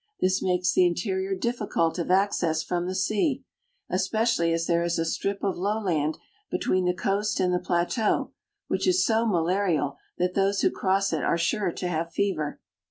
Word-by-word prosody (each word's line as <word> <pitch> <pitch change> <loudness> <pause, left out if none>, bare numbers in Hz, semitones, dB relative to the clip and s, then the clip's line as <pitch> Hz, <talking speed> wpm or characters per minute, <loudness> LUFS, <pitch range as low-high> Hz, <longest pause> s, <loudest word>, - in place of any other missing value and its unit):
This 185 +1 +2
makes 180 -1 +1
the 185 - +5
interior 190 +2 -1
difficult 200 -6 -1
of 170 - -3
access 180 -4 +2
from 175 0 -2
the 185 - -3
sea,. 190 +3 0
FROM - - -2
NEW - - +4
YORK 265 - -2
TO - - -28
GIBRALTAR 485 +1 -20
n - - +3 0.3
especially 170 -8 +2
as 165 0 0
there 170 0 +2
is 170 0 0
a 165 - 0
strip 195 +4 -2
of 195 -2 0
lowland 180 -6 0 0.3
between 185 0 0
the 180 0 +1
coast 200 +3 0
and 180 -1 +2
the 180 - +2
plateau, 175 +7 0 0.4
which - - -1
is 365 0 +3
so 225 0 +2
malarial 175 -5 +1 0.2
that 180 +1 0
those 195 +1 +1
who - - +3
cross 195 -1 0
it 155 - -1
are - - +2
sure 190 +2 0
to 180 - -3
have 165 -1 -2
fever. 170 -7 -1
185 Hz, 205 wpm, -26 LUFS, 170-200 Hz, 0.4 s, the